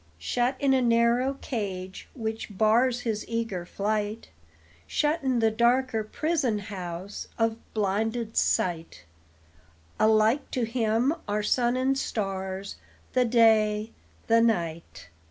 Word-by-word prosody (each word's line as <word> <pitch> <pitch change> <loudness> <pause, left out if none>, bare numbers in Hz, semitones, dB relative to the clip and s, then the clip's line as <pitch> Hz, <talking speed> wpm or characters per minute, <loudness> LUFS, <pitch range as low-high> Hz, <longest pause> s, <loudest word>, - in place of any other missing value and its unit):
Shut 245 - 0
in 275 -1 +3
a 260 - +3
narrow 235 +3 +2
cage, 190 -6 -5
which 220 -4 -5
bars 235 +4 +3
His 220 -3 -2
eager 225 -7 -3
flight, 210 +2 -2 0.6
Shut 305 +2 0
in 260 -2 +1
the 225 -1 +3
darker 240 0 +2
prison 280 -1 -1
house 190 -2 -6
Of 225 -1 +1 0.2
blinded 220 +3 -1
sight, 165 - 0 1.0
Alike 220 +5 +3
to 250 - -1
him 230 +3 +1
are 210 +1 -1
sun 240 +3 +1
and 265 +1 +1
stars, 195 -5 -3 0.4
The 255 -1 +3
day, 220 -2 +3 0.3
the 230 0 +4
night. 170 - -1
225 Hz, 120 wpm, -27 LUFS, 205-245 Hz, 1.0 s, the